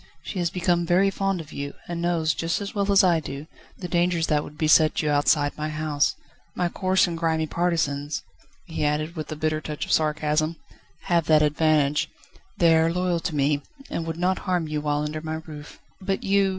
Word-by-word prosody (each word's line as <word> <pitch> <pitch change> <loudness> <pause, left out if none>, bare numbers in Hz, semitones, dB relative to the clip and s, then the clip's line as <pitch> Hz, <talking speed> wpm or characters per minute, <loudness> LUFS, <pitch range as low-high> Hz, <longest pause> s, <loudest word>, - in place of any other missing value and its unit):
"She 190 - -5
has 175 -1 +1
become 175 -1 +1
very 185 +3 +3
fond 195 -1 -1
of 155 -1 -12
you, 140 0 -5
and 170 -1 -4
knows, 165 -3 +1
just 165 +1 -1
as 200 -1 -5
well 200 -1 0
as 200 0 +6
I 175 -3 +4
do, 145 -1 -7 0.3
the 180 - -5
dangers 175 -1 +1
that 150 -2 +1
would 150 - -11
beset 155 0 +4
you 150 - +1
outside 145 0 +2
my 155 0 -3
house. 155 -1 0 0.4
My 180 -1 0
coarse 185 +2 +2
and 175 -2 -3
grimy 160 -1 0
partisans," 155 -4 -1 0.4
he 160 -4 -4
added, 155 +3 0
with 155 -2 -6
a - - -3
bitter 155 0 -1
touch 150 -1 -4
of - - -6
sarcasm, 155 +1 +1 0.5
"have 170 -3 +1
that 155 -1 +5
advantage, 150 -1 +2 0.2
that - - -24 0.2
they 170 -4 +5
are 165 +1 +3
loyal 180 0 0
to 165 -1 -3
me, 145 0 +2 0.3
and 165 - -3
would 165 0 -3
not 185 +2 +1
harm 175 -3 +1
you 150 -1 -2
while 150 0 0
under 155 +1 -4
my 160 0 -4
roof." 150 -2 -10 0.2
"But 195 0 -2
you 195 0 +3
160 Hz, 205 wpm, -25 LUFS, 150-175 Hz, 0.5 s, as